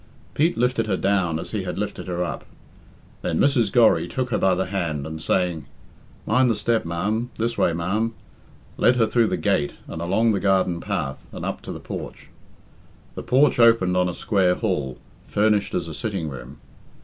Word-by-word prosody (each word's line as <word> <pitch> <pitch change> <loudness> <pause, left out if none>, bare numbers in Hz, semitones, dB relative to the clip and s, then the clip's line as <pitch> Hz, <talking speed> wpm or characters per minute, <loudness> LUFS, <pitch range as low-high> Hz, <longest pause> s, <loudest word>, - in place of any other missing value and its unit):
Pete 160 0 +1
lifted 120 -2 +1
her 95 -3 0
down 95 -5 +1
as - - -7
he 105 - -2
had 90 -1 -5
lifted 100 -1 -4
her 90 0 -1
up. 85 - -5 0.8
Then 80 - -1
Mrs. 125 -8 +3
Gorry 120 -3 +4
took 130 -2 -3
her - - +1
by 95 -1 +3
the 95 +1 -1
hand, 85 -7 -2
and 80 0 -6
saying, 90 -2 0 0.6
"Mind 125 +3 +3
the 115 - +2
step, 115 -1 0
ma'am 105 +8 -2
this 115 +1 -1
way, - - +2
ma'am," 100 +7 -1 0.6
led 125 - +4
her 115 -2 +3
through 115 +1 +2
the - - -1
gate 70 - 0
and 80 - -6
along 100 +7 +2
the 100 - 0
garden 95 -3 +2
path, 65 0 -4
and - - -6
up - - -4
to - - -7
the - - -6
porch. - - -8 0.8
The - - -6
porch 130 0 +3
opened 115 -6 +5
on 90 0 +2
a 90 - -5
square 95 -3 +2
hall, 75 - -2 0.3
furnished 105 -1 +1
as 85 -2 -1
a 80 - -6
sitting 95 -5 -3
room. 70 +1 -9
95 Hz, 190 wpm, -23 LUFS, 85-115 Hz, 0.8 s, opened